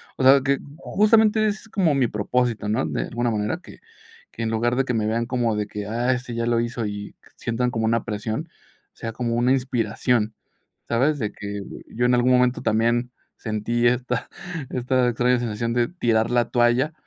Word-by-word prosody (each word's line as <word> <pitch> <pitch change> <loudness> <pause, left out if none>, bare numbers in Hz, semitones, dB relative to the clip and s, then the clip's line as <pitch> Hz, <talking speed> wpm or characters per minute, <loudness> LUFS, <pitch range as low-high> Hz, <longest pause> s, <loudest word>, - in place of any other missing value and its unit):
O - - -2
sea, 135 +1 +7
que 135 +1 +1 0.2
justamente 215 +3 +3
ese 210 0 -1
es 225 - -17
como 185 -7 +2
mi 135 -3 +2
propósito, 110 0 -1
¿no? 110 +5 +1
De - - -2
alguna 120 0 -1
manera, 105 0 -1
que - - -14 0.5
que 115 - -5
en 115 - 0
lugar 120 +2 +1
de 135 - +2
que 125 - -1
me 110 -2 0
vean 115 +2 0
como 120 -2 0
de 105 0 -1
que, 105 -1 -6
"ah, 120 +4 0
este 125 -1 -5
ya 115 0 -1
lo 120 -1 +2
hizo" 115 -1 -2
y 105 0 -6 0.2
sientan 125 +1 -1
como 115 -2 -1
una 115 0 +1
presión, 110 +5 -3
que - - -31 0.4
sea 115 - -5
como 120 0 -2
una 120 +2 +2
inspiración, 120 -3 0 0.5
¿sabes? 135 +6 +2
De 105 -4 -2
que 100 0 -6 0.2
yo 120 +2 -1
en 125 - +3
algún 125 +1 +3
momento 125 0 +3
también 120 +3 +1 0.3
sentí 115 +2 0
esta 125 0 -1 0.4
esta 125 0 +1
extraña 125 +1 +2
sensación 115 0 -2
de 120 -1 +2
tirar 115 -10 +1
la 120 -1 +2
toalla 120 +5 +2
120 Hz, 195 wpm, -23 LUFS, 110-125 Hz, 0.5 s, sea